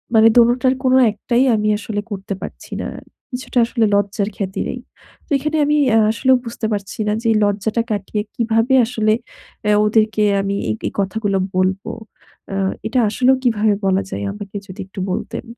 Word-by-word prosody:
মানে 220 Hz, 0 st, +7 dB
দোনোটার 250 Hz, +2 st, +4 dB
কোন 255 Hz, -1 st, +3 dB, 0.2 s
একটাই 235 Hz, +4 st, 0 dB
আমি 210 Hz, 0 st, 0 dB
আসলে 205 Hz, 0 st, -4 dB
করতে 195 Hz, 0 st, -4 dB
পারছি -, -, -8 dB
না। -, -, -3 dB, 0.4 s
কিছুটা 250 Hz, 0 st, -2 dB
আসলে 230 Hz, -1 st, +1 dB
লজ্জার 200 Hz, +1 st, 0 dB
খাতিরেই। 195 Hz, +5 st, -3 dB, 0.5 s
তো -, -, -35 dB
এখানে 305 Hz, +3 st, -2 dB
আমি 300 Hz, +1 st, +2 dB, 0.2 s
আ -, -, +6 dB
আসলেও 260 Hz, +3 st, +3 dB
বুঝতে 230 Hz, -1 st, -5 dB
পারছি 200 Hz, +1 st, -5 dB
না 210 Hz, -, +2 dB
যে -, -, -16 dB
এই -, -, +3 dB
লজ্জাটা 210 Hz, +3 st, 0 dB
কাটিয়ে 210 Hz, 0 st, -2 dB
কিভাবে 230 Hz, +2 st, +1 dB
আসলে 220 Hz, -2 st, +1 dB, 0.5 s
অ্যা 210 Hz, 0 st, +3 dB
ওদেরকে 215 Hz, 0 st, +2 dB, 0.2 s
আমি 195 Hz, 0 st, -2 dB
এই -, -, +1 dB
এই -, -, -4 dB
কথাগুলো 200 Hz, 0 st, 0 dB, 0.2 s
বলব? 185 Hz, +1 st, +1 dB, 0.7 s
আ -, -, -2 dB, 0.3 s
এটা 250 Hz, +3 st, +1 dB
আসলেও 255 Hz, +5 st, +3 dB
কিভাবে 220 Hz, -3 st, +2 dB
বলা 190 Hz, 0 st, +2 dB
যায় -, -, -4 dB
আমাকে 205 Hz, -1 st, -9 dB
যদি 185 Hz, -, -11 dB
একটু 190 Hz, +1 st, -10 dB
বলতেন? 215 Hz, -, -4 dB
215 Hz, 170 wpm, -19 LUFS, 200-235 Hz, 0.7 s, মানে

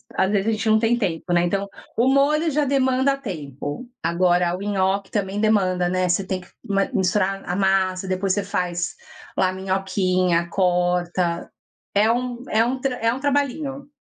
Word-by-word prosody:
às 190 Hz, +1 st, +2 dB
vezes 205 Hz, 0 st, +1 dB
a -, -, +3 dB
gente 220 Hz, 0 st, -2 dB
não 220 Hz, 0 st, +5 dB
tem 230 Hz, +2 st, +2 dB
tempo 175 Hz, -5 st, -2 dB
né, 175 Hz, 0 st, +3 dB
então 195 Hz, +3 st, -1 dB, 0.3 s
o 240 Hz, +3 st, +2 dB
molho 300 Hz, +4 st, +3 dB
já 300 Hz, 0 st, +1 dB
demanda 265 Hz, 0 st, +2 dB
tempo, 155 Hz, -, -6 dB
agora 175 Hz, +1 st, +2 dB
o -, -, -9 dB
nhoque 195 Hz, -1 st, 0 dB
também 200 Hz, -1 st, -2 dB
demanda, 190 Hz, -5 st, +2 dB
né, 185 Hz, 0 st, 0 dB
você 175 Hz, +3 st, +2 dB
tem 185 Hz, -1 st, -3 dB
que 180 Hz, -, -16 dB, 0.5 s
misturar 195 Hz, +1 st, +1 dB
a 180 Hz, -, -1 dB
massa 190 Hz, -1 st, +1 dB
depois 185 Hz, +1 st, 0 dB
você 205 Hz, -, -1 dB
faz 175 Hz, -2 st, -2 dB, 0.4 s
lá 185 Hz, -1 st, +2 dB
minhoquinha 185 Hz, -2 st, 0 dB
corta, 175 Hz, -1 st, 0 dB, 0.4 s
é 215 Hz, +3 st, +4 dB
um 245 Hz, 0 st, -3 dB
é 220 Hz, -, +4 dB
um 255 Hz, +3 st, -1 dB
tra 260 Hz, -1 st, -1 dB
é 230 Hz, 0 st, +2 dB
um 265 Hz, -, -6 dB
trabalhinho. 280 Hz, 0 st, -1 dB
195 Hz, 170 wpm, -22 LUFS, 180-235 Hz, 0.5 s, não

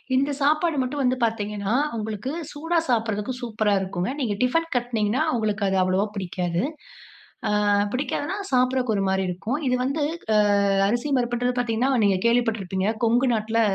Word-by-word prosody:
இந்த 275 Hz, +2 st, +2 dB
சாப்பாடு 305 Hz, +2 st, +2 dB
மட்டும் 260 Hz, +3 st, -2 dB
வந்து 255 Hz, 0 st, +2 dB
பார்த்தீங்கன்னா, 210 Hz, -2 st, -2 dB, 0.2 s
உங்களுக்கு 215 Hz, +3 st, -4 dB, 0.2 s
சூடா 325 Hz, +4 st, -1 dB
சாப்பிடுறதுக்கு 220 Hz, -1 st, 0 dB
சூப்பரா 215 Hz, -3 st, 0 dB
இருக்குங்க. 185 Hz, 0 st, -3 dB
நீங்க 240 Hz, -7 st, 0 dB
டிஃபன் 330 Hz, +6 st, +1 dB
கட்டுனிங்கன்னா, 240 Hz, +1 st, 0 dB
உங்களுக்கு 215 Hz, -2 st, -1 dB
அது 190 Hz, -, +1 dB
அவ்வளோவா 185 Hz, +2 st, +1 dB
பிடிக்காது. 180 Hz, -2 st, -2 dB, 1.0 s
அ -, -, +1 dB, 0.3 s
பிடிக்காதுனா 290 Hz, +6 st, -2 dB, 0.2 s
சாப்பிடறக்கு 255 Hz, -2 st, +2 dB
ஒரு 195 Hz, -, 0 dB
மாரி 190 Hz, 0 st, +1 dB
இருக்கும். 210 Hz, +10 st, -3 dB
இது 250 Hz, -, +2 dB
வந்து 280 Hz, +4 st, -1 dB, 0.9 s
அரிசி 240 Hz, +6 st, -1 dB
பருப்புன்றது 245 Hz, +1 st, -1 dB
பார்த்தீங்கன்னா, 240 Hz, +2 st, +1 dB
நீங்க 195 Hz, -2 st, +3 dB
கேள்விப்பட்டுருப்பீங்க. 215 Hz, -5 st, 0 dB, 0.2 s
கொங்கு 240 Hz, +3 st, +3 dB
நாட்டுல 220 Hz, +1 st, 0 dB
230 Hz, 140 wpm, -24 LUFS, 205-255 Hz, 1.0 s, நீங்க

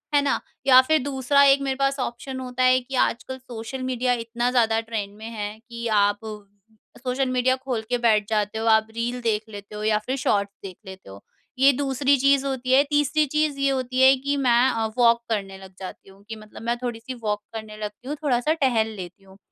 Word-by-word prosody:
है 285 Hz, -, +5 dB
ना? 280 Hz, -, 0 dB, 0.3 s
या 255 Hz, -1 st, +9 dB
फिर 315 Hz, +4 st, +2 dB
दूसरा 280 Hz, 0 st, +2 dB
एक 275 Hz, 0 st, +5 dB
मेरे 270 Hz, -1 st, -1 dB
पास 275 Hz, 0 st, 0 dB
ऑप्शन 260 Hz, +2 st, -4 dB
होता 255 Hz, 0 st, -3 dB
है 255 Hz, 0 st, +5 dB
कि 255 Hz, +2 st, -8 dB
आजकल 255 Hz, +1 st, 0 dB
सोशल 250 Hz, +1 st, -8 dB
मीडिया 250 Hz, -1 st, 0 dB
इतना 235 Hz, +1 st, -2 dB
ज़्यादा 225 Hz, -3 st, +2 dB
ट्रेंड 220 Hz, -3 st, -5 dB
में 220 Hz, -, -10 dB
है 210 Hz, -2 st, -5 dB
कि 235 Hz, 0 st, -5 dB
आप 205 Hz, 0 st, +2 dB, 0.8 s
सोशल 255 Hz, +1 st, -1 dB
मीडिया 255 Hz, 0 st, +2 dB
खोल 260 Hz, -4 st, -4 dB
के 245 Hz, -, +1 dB
बैठ 215 Hz, -4 st, +2 dB
जाते 210 Hz, -1 st, -1 dB
हो 225 Hz, -, -3 dB
आप 220 Hz, 0 st, +4 dB
रील 240 Hz, +2 st, -3 dB
देख 220 Hz, -2 st, 0 dB
लेते 205 Hz, 0 st, -10 dB
हो 210 Hz, -, -5 dB
या 215 Hz, 0 st, +2 dB
फिर 260 Hz, -, -1 dB
शॉर्ट्स 200 Hz, -5 st, 0 dB
देख 190 Hz, -2 st, -8 dB
लेते 190 Hz, -, -11 dB
हो, 100 Hz, +1 st, -12 dB, 0.4 s
ये 275 Hz, +1 st, +7 dB
दूसरी 275 Hz, +1 st, +1 dB
चीज़ 275 Hz, +1 st, +3 dB
होती 260 Hz, -2 st, -2 dB
है 275 Hz, +2 st, +6 dB
तीसरी 295 Hz, +1 st, +2 dB
चीज़ 300 Hz, 0 st, -1 dB
ये 275 Hz, -, +2 dB
होती 260 Hz, -1 st, -1 dB
है 265 Hz, +1 st, +7 dB
कि 280 Hz, +2 st, -2 dB
मैं 250 Hz, -1 st, +3 dB
अ, 225 Hz, -1 st, -1 dB
वॉक 235 Hz, -1 st, +4 dB
करने 195 Hz, -3 st, -3 dB
लग 190 Hz, -1 st, -14 dB
जाती 190 Hz, 0 st, -9 dB
हूँ 195 Hz, +1 st, -19 dB
कि 225 Hz, -, -5 dB
मतलब 215 Hz, 0 st, -13 dB
मैं 235 Hz, +1 st, -1 dB
थोड़ी-सी 240 Hz, +1 st, -5 dB
वॉक 210 Hz, -1 st, -1 dB
करने 215 Hz, -1 st, -7 dB
लगती 210 Hz, +3 st, -7 dB
हूँ 295 Hz, -, -3 dB
थोड़ा-सा 265 Hz, +1 st, +1 dB
टहल 250 Hz, -8 st, +1 dB
लेती 185 Hz, 0 st, -9 dB
हूँ। 190 Hz, 0 st, -18 dB
245 Hz, 215 wpm, -24 LUFS, 215-265 Hz, 0.8 s, या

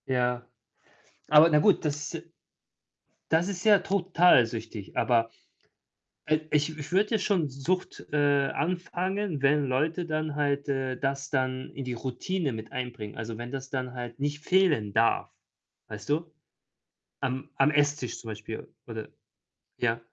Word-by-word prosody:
Ja. 125 Hz, -1 st, 0 dB, 0.8 s
Aber 155 Hz, +2 st, +8 dB
na 150 Hz, -, +5 dB
gut, 190 Hz, +4 st, +4 dB
das 150 Hz, -1 st, -2 dB, 1.2 s
das 165 Hz, +3 st, +3 dB
ist 190 Hz, -2 st, -4 dB
ja 210 Hz, -2 st, +7 dB
total 180 Hz, -7 st, +4 dB
süchtig. 110 Hz, -3 st, -7 dB
Aber 115 Hz, -2 st, +3 dB, 1.0 s
i 155 Hz, -, +5 dB
ich 150 Hz, +1 st, +1 dB
ich 150 Hz, +3 st, -7 dB
würde 200 Hz, +3 st, +3 dB
ja 220 Hz, -, +3 dB
schon 190 Hz, -6 st, +1 dB
Sucht, 140 Hz, +8 st, -3 dB
äh, -, -, +1 dB, 0.4 s
anfangen, 180 Hz, 0 st, -2 dB
wenn 145 Hz, +1 st, +4 dB
Leute 155 Hz, +7 st, 0 dB
dann 155 Hz, -2 st, -2 dB
halt, 145 Hz, -1 st, 0 dB
äh, 135 Hz, -2 st, -1 dB
das 135 Hz, +2 st, -2 dB
dann 130 Hz, -1 st, -1 dB
in 135 Hz, -, -5 dB
die 125 Hz, -1 st, -3 dB
Routine 135 Hz, +6 st, -2 dB
mit 110 Hz, -1 st, -7 dB
einbringen. 120 Hz, -4 st, -5 dB
Also, 110 Hz, 0 st, -4 dB
wenn 120 Hz, +2 st, -6 dB
das 135 Hz, 0 st, -5 dB
dann 130 Hz, -2 st, -3 dB
halt 120 Hz, 0 st, -7 dB
nicht 145 Hz, +2 st, -2 dB
fehlen 165 Hz, -, +3 dB
darf, 115 Hz, +1 st, +3 dB, 0.6 s
weißt 105 Hz, -1 st, -8 dB
du? 160 Hz, +3 st, 0 dB, 0.9 s
Am 130 Hz, 0 st, -2 dB
am 135 Hz, +2 st, +4 dB
Esstisch 145 Hz, -4 st, +1 dB
zum 115 Hz, -, -10 dB
Beispiel 110 Hz, +1 st, -7 dB, 0.2 s
oder 110 Hz, -2 st, -6 dB, 0.7 s
ja? 115 Hz, -1 st, +1 dB
140 Hz, 145 wpm, -28 LUFS, 125-160 Hz, 1.2 s, Aber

